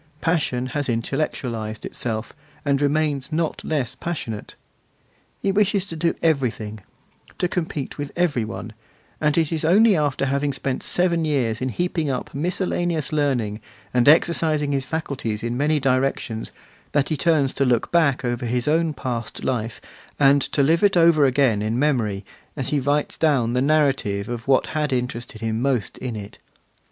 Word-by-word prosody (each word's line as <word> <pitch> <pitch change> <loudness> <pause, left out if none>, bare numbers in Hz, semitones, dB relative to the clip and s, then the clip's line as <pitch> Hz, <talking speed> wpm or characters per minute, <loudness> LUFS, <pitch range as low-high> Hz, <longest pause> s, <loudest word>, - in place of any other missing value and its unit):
Passion 150 -7 0
has 145 -3 -1
intellectualised 115 -3 -2
itself, 110 -2 -4 0.3
and 140 -1 +2
remains 145 -1 0
not 160 0 -1
less 140 -7 -1
passionate. 120 -11 -5 0.8
He 195 - +1
wishes 200 -1 +2
to 165 - -7
do 165 +1 0
everything, 120 -9 0 0.6
to 180 - +1
compete 160 -6 -4
with 145 -1 -4
every 165 -9 +1
one; 110 0 -6 0.5
and 150 0 +2
it 160 -3 +2
is 160 -1 -1
only 200 +6 +5
after 145 -3 0
having 140 +1 0
spent 130 0 -3
seven 175 -2 +2
years 130 -8 0
in 130 - 0
heaping 165 +1 -1
up 130 -2 -3
miscellaneous 170 -1 -1
learning, 125 -8 0 0.3
and 125 +2 +5
exercising 155 -2 +3
his 135 -2 -1
faculties 130 -8 -3
in 120 +1 -2
many 150 +3 +2
directions, 130 -4 0 0.4
that 145 -2 +2
he 155 - 0
turns 145 -2 +2
to 140 - +1
look 125 -3 +1
back 150 -7 +2
over 120 0 -2
his 125 +2 -1
own 160 0 +2
past 120 -4 -4
life, 115 -4 -2 0.4
and 140 0 +5
to 140 - +1
live 165 +4 +3
it 200 -3 +4
over 165 -3 +5
again 130 -5 +2
in 110 +2 -1
memory, 115 -9 0 0.3
as 135 - -2
he 150 - +1
writes 145 +2 0
down 135 -7 +2
the 125 - +1
narrative 135 -9 +1
of 120 0 -5
what 135 -1 +4
had 150 -2 0
interested 125 -3 -3
him 110 0 -1
most 130 -4 -1
in 125 -3 -4
it. 105 -1 -8
140 Hz, 165 wpm, -23 LUFS, 120-155 Hz, 0.8 s, only